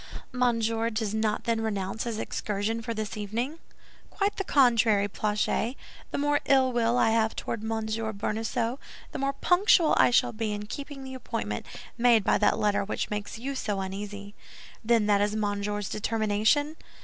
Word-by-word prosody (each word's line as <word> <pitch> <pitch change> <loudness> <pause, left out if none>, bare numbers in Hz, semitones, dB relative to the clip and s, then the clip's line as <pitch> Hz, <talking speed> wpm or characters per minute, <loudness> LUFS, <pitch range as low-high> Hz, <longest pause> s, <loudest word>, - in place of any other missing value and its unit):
"Monsieur 230 -2 +1
does 215 -2 -2
not 220 -1 0
then 230 -1 0
renounce 205 -1 -2
his 230 -2 -3
excursion 215 +1 -2
for 230 - -5
this 215 -2 -4
evening?" 235 +9 -3 0.5
"Quite 405 0 -1
the 390 - -1
contrary, 230 - +4
Planchet; 215 +4 -1 0.3
the - - -3
more 290 0 +2
ill 260 -2 +4
will 235 0 +2
I 225 - +4
have 220 -1 +1
toward 230 - -4
Monsieur 220 0 -2
Bonacieux, 225 +4 -2 0.3
the - - -5
more 275 0 0
punctual 355 +1 +4
I - - +6
shall 240 - +3
be 215 -1 -2
in 205 0 -5
keeping 280 +4 -7
the 265 0 -7
appointment 105 - -4 0.3
made 235 -3 +5
by - - +2
that - - +3
letter 205 -1 +1
which 205 - -3
makes 210 0 -4
you 265 +5 -4
so 210 -7 -2
uneasy." 200 +1 -6 0.5
"Then 230 -1 +3
that 205 -1 +3
is 210 +1 +1
Monsieur's 205 -1 -2
determination?" 220 +8 +1
220 Hz, 165 wpm, -27 LUFS, 210-245 Hz, 0.5 s, I